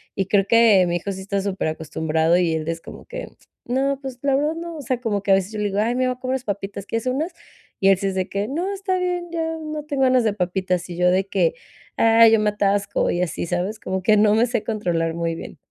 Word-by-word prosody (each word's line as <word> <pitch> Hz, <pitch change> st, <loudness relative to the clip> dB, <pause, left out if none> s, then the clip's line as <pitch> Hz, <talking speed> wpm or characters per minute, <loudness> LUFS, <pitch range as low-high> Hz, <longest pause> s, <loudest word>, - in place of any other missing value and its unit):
y 195 Hz, -, 0 dB
creo 195 Hz, -1 st, +3 dB
que 220 Hz, -4 st, +5 dB
mi 175 Hz, -, 0 dB
hijo 200 Hz, +3 st, -4 dB
sí 190 Hz, -, -7 dB
está 200 Hz, +1 st, -2 dB
superacostumbrado 160 Hz, -3 st, 0 dB
y 175 Hz, -3 st, +1 dB
él 155 Hz, 0 st, -3 dB
es 165 Hz, 0 st, -3 dB
como -, -, -11 dB
que: -, -, -7 dB, 0.4 s
"No", 270 Hz, +2 st, 0 dB
pues, 265 Hz, -2 st, -7 dB
la 275 Hz, -1 st, +2 dB
verdad 300 Hz, +3 st, 0 dB
no, 335 Hz, 0 st, -6 dB
o 295 Hz, -, -6 dB
sea, 255 Hz, -1 st, -2 dB
como 205 Hz, -4 st, -1 dB
que 200 Hz, -, +1 dB
a -, -, +8 dB
veces 190 Hz, +1 st, -1 dB
yo 215 Hz, -, -4 dB
le 210 Hz, -, 0 dB
digo: 200 Hz, +1 st, -2 dB
"Ay, 230 Hz, +3 st, +1 dB
me 255 Hz, 0 st, +1 dB
voy 250 Hz, -, -2 dB
a -, -, -27 dB
comer 260 Hz, 0 st, -2 dB
papitas, 200 Hz, -1 st, -4 dB
¿quieres 230 Hz, +4 st, -3 dB
unas?", 295 Hz, +8 st, -1 dB, 0.5 s
y 195 Hz, -, +3 dB
él 195 Hz, -, +5 dB
sí 195 Hz, -, -2 dB
es 190 Hz, -, -2 dB
de 185 Hz, 0 st, -1 dB
que: 200 Hz, +1 st, -2 dB
"No, 355 Hz, +7 st, -2 dB
está 380 Hz, -1 st, -1 dB
bien, 355 Hz, -1 st, -2 dB
ya 325 Hz, -1 st, -2 dB
no 305 Hz, -1 st, -5 dB
tengo 285 Hz, -3 st, -1 dB
ganas 255 Hz, -2 st, +4 dB
de 215 Hz, -, +2 dB
papitas", 185 Hz, -2 st, -1 dB
y 175 Hz, -, -6 dB
yo 180 Hz, 0 st, +4 dB
de 185 Hz, +1 st, +2 dB
que, 190 Hz, -4 st, +1 dB, 0.4 s
ay, 225 Hz, 0 st, +6 dB
yo 225 Hz, -, +5 dB
me 210 Hz, -, +2 dB
atasco 200 Hz, -1 st, 0 dB
y 175 Hz, -, -1 dB
así, 180 Hz, -1 st, -2 dB
¿sabes?, 185 Hz, +5 st, -2 dB
como 190 Hz, 0 st, -3 dB
que 215 Hz, +2 st, +4 dB
no 210 Hz, 0 st, +4 dB
me 225 Hz, +2 st, +4 dB
sé 240 Hz, -3 st, -1 dB
controlar 175 Hz, -7 st, -1 dB
muy 165 Hz, -1 st, -2 dB
bien. 165 Hz, -, -9 dB
205 Hz, 265 wpm, -22 LUFS, 185-255 Hz, 0.5 s, a